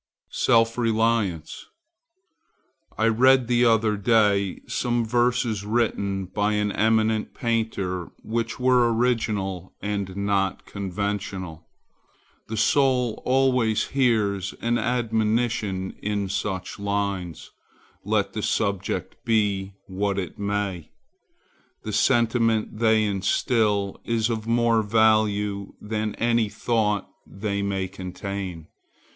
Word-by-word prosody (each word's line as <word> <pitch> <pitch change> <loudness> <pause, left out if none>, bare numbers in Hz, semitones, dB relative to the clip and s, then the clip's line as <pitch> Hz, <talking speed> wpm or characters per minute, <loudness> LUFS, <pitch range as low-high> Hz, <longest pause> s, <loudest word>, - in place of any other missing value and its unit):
SELF 115 +1 +2
RELIANCE 110 -7 0 1.3
I 110 - +2
read 130 +3 +5
the 120 +1 +3
other 110 -2 +3
day 100 -2 +2
some 120 -1 0
verses 120 -2 +1
written 100 -3 -1
by 105 +3 -1
an 105 0 0
eminent 110 0 +1
painter 110 -7 -2
which 115 +2 -3
were 125 -2 +4
original 105 -6 -1
and 100 -2 -3
not 100 -1 0
conventional. 95 -4 -4 0.8
The 110 - -4
soul 125 0 +2
always 125 -4 +2
hears 105 -8 +1
an 120 0 0
admonition 110 -4 0
in 100 -2 -2
such 95 -1 -3
lines, 100 -4 -3 0.5
let - - 0
the - - -3
subject 100 -3 -2
be 100 -3 0
what 100 +1 -2
it 95 0 -5
may. 100 -5 -2 0.9
The 110 - -5
sentiment 115 -1 +2
they 110 -1 +4
instil 100 0 0
is 115 0 0
of 110 -1 -4
more 115 -1 +3
value 105 -2 +1
than 105 0 -3
any 115 -2 +1
thought 105 -3 0 0.2
they 100 0 -3
may 95 -1 -1
contain. 95 -2 -6
105 Hz, 105 wpm, -24 LUFS, 100-115 Hz, 1.3 s, read